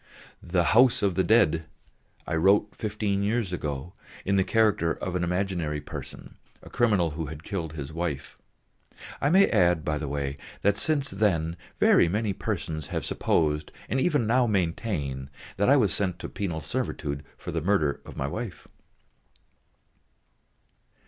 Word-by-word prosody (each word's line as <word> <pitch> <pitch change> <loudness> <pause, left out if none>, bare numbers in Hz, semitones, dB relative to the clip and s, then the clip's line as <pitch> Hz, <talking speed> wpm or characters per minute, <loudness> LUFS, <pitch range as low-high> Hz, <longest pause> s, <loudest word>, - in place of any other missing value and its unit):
The 85 0 +1
House 120 -1 +5
of 100 -2 +2
the 95 - +2
Dead 80 -8 +3 0.6
I - - -4
wrote 100 +6 +3
fifteen 105 -2 -1
years 105 -2 0
ago 75 0 -4 0.3
in 100 - +2
the 95 - +4
character 105 -5 +2
of 90 - -5
an 90 - 0
imaginary 85 -4 -1
person, - - -9 0.3
a - - -12
criminal 105 -9 +2
who 80 +1 -4
had 75 +2 -8
killed 85 -6 -4
his 75 -1 -6
wife. 80 -5 -3 0.9
I 140 - +3
may 190 +4 +6
add 90 -6 +3
by 75 -1 0
the 75 - -4
way 70 0 -3 0.3
that 100 0 +4
since 140 +5 +1
then, 85 -5 +1 0.2
very - - +5
many 105 +2 0
persons 80 -8 -3
have - - -3
supposed, 75 -1 0 0.2
and 130 +5 0
even 145 -6 +2
now 120 +2 +3
maintain, 80 - -1 0.3
that 100 +4 +3
I 140 - +7
was 105 - +3
sent 90 -2 -1
to - - -7
penal 85 -6 -3
servitude 70 0 -3
for - - -6
the 80 - -2
murder 80 -5 +1
of - - -11
my 65 - -1
wife. 110 +8 -5
90 Hz, 155 wpm, -27 LUFS, 80-105 Hz, 0.9 s, I